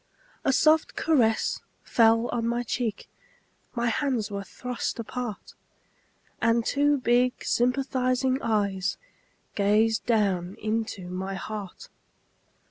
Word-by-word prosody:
A - - +3
soft 310 +4 +3
caress 235 -9 +2 0.2
fell 230 0 +4
on 230 -1 -1
my 240 +1 0
cheek, 230 -3 -3 0.7
My 235 0 0
hands 240 -4 -1
were 200 0 -4
thrust 250 +4 -4
apart. 230 -2 -5 0.9
And 230 0 +2
two 290 +1 +2
big 245 0 +1
sympathizing 255 +1 +1
eyes 200 -4 0 0.6
Gazed 215 +2 +2
down 195 -5 +1
into 215 -3 -2
my 190 +2 -4
heart. 200 -1 -7
230 Hz, 105 wpm, -26 LUFS, 205-250 Hz, 0.9 s, fell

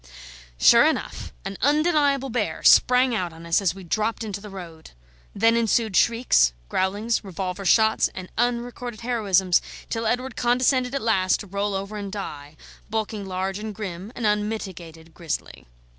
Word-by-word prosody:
Sure - - +7
enough - - -3
an 195 0 -5
undeniable 290 -2 +2
bear 210 -9 -2
sprang 250 0 +5
out 180 -6 -2
on 165 +1 -12
us 170 +3 +2
as 185 -2 0
we 195 - -10
dropped 215 +6 -1
into 200 -2 -5
the 210 - -9
road; 170 -5 -10 0.5
then 225 +2 +3
ensued 225 -2 +1
shrieks, 230 - +3 0.2
growlings, 205 +5 0
revolver 190 0 -5
shots, 220 +4 +4
and 185 -1 -7
unrecorded 240 -1 -2
heroisms, 195 -7 +2 0.3
till 225 -1 -1
Edward 250 +2 -1
condescended 250 +1 +1
at 275 - -2
last 190 -5 +2
to - - -8
roll 200 +1 -2
over 195 +2 -4
and 200 -1 -5
die, 150 -7 -7 0.3
bulking 215 -2 -3
large 190 +1 -3
and 215 -1 -6
grim, 190 0 -6
an 235 - -3
unmitigated 190 -6 -3
grizzly. 160 - -6
210 Hz, 155 wpm, -24 LUFS, 185-235 Hz, 0.5 s, Sure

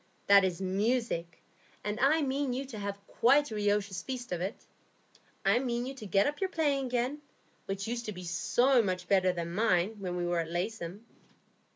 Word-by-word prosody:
"That 200 -1 +7
is 185 -2 0
music, 195 -2 -1 0.4
and 210 +2 -3
I 300 +4 +4
mean 275 -1 0
you 265 +2 -3
to 240 -5 -8
have 200 0 -3
quite 275 +5 +3
a - - -4
riotous 205 -2 0
feast 255 -4 -6
of 175 -1 -2
it. 190 +4 -4 0.8
I - - +4
mean 240 -2 -1
you 265 - -5
to 225 -6 -9
get 195 +1 +3
up 295 +4 -2
your 385 - +1
playing 285 -6 0
again, 250 +4 -1 0.5
which 195 0 -3
used 235 0 -3
to - - -2
be 180 -2 -8
so 240 - +3
much 185 -3 -2
better 185 -2 +4
than 170 -1 -4
mine, 200 0 +2
when 180 -2 -3
we 175 0 -1
were 175 0 0
at 165 -1 -2
Laceham." 185 +3 -4
210 Hz, 195 wpm, -31 LUFS, 185-250 Hz, 0.8 s, That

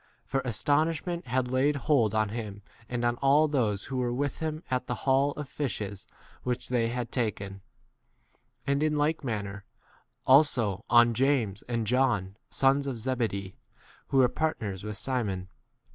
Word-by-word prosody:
For 135 - -1
astonishment 155 +7 0
had 125 0 0
laid 130 +4 +2
hold 120 -6 +2
on 110 -1 +2
him 105 -2 -6 0.3
and 120 -1 -1
on 120 0 +1
all 140 +4 +4
those 110 -9 0
who 135 - -4
were 125 -1 0
with 135 +2 -2
him 155 0 -3
at 125 0 0
the 125 - -1
haul 135 +1 +4
of 150 -2 -6
fishes 105 -9 -4 0.3
which 125 0 -3
they 120 -2 +2
had 120 0 -3
10 125 - +1
taken; 100 -2 -6 1.0
and 140 +1 +1
in 155 -1 +1
like 150 +2 +1
manner 105 -4 -4 0.6
also 120 -8 +4
on 120 0 +6
James 120 -6 +1
and 115 -2 0
John, 110 -5 +1
sons 140 +1 +3
of 130 -3 -3
Zebe 120 0 0
dee, 100 -1 -6 0.5
who 135 - 0
were 130 -2 +7
partners 110 - -2
with 105 -1 -5
Simon. 105 -8 -2
125 Hz, 160 wpm, -28 LUFS, 110-140 Hz, 1.0 s, were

